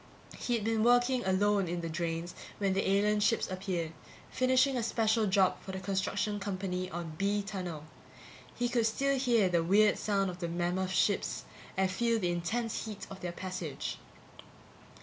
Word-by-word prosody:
He'd 235 -3 -1
been 220 0 +1
working 245 +1 +4
alone 200 0 +2
in 175 +1 -2
the 165 - -3
drains 165 +1 -3 0.2
when 195 -2 +1
the 195 0 0
alien 210 +2 +3
ships 220 +2 +2
appeared, 185 -4 -2 0.4
finishing 255 +1 +3
a 245 - 0
special 225 -1 +2
job 190 -1 +3
for 190 - -7
the 190 - -3
construction 195 +2 -1
company 185 -2 -3
on 170 -2 -5
B 200 +1 +1
tunnel. 180 -6 -5 0.7
He 245 - 0
could 240 -2 +2
still 275 +4 +1
hear 235 -6 +3
the 170 -2 +2
weird 205 +4 +4
sound 195 -3 +1
of 180 - -10
the 170 - -2
mammoth 175 +2 -1
ships 190 +1 +1 0.3
and 190 -1 +2
feel 230 +4 +1
the 180 -5 0
intense 220 +9 -2
heat 210 -2 -6
of 195 - -8
their 175 - -4
passage. 185 -4 -5
195 Hz, 170 wpm, -31 LUFS, 180-220 Hz, 0.7 s, working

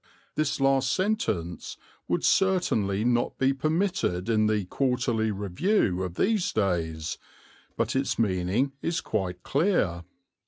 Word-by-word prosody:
(This 155 -2 -1
last 135 -1 +3
sentence 185 - -1 0.3
would - - 0
certainly 115 - +2
not 120 0 +1
be 135 +1 +2
permitted 155 - 0
in 110 -1 +3
the 105 -2 0
Quarterly 120 -1 0
Review 100 - 0
of 90 -2 -4
these 205 - +1
days, 85 -6 -1 0.6
but - - 0
its 135 +1 0
meaning 100 +5 +1
is 165 0 -1
quite 90 -4 -3
clear.) 135 - +1
115 Hz, 120 wpm, -27 LUFS, 95-155 Hz, 0.6 s, last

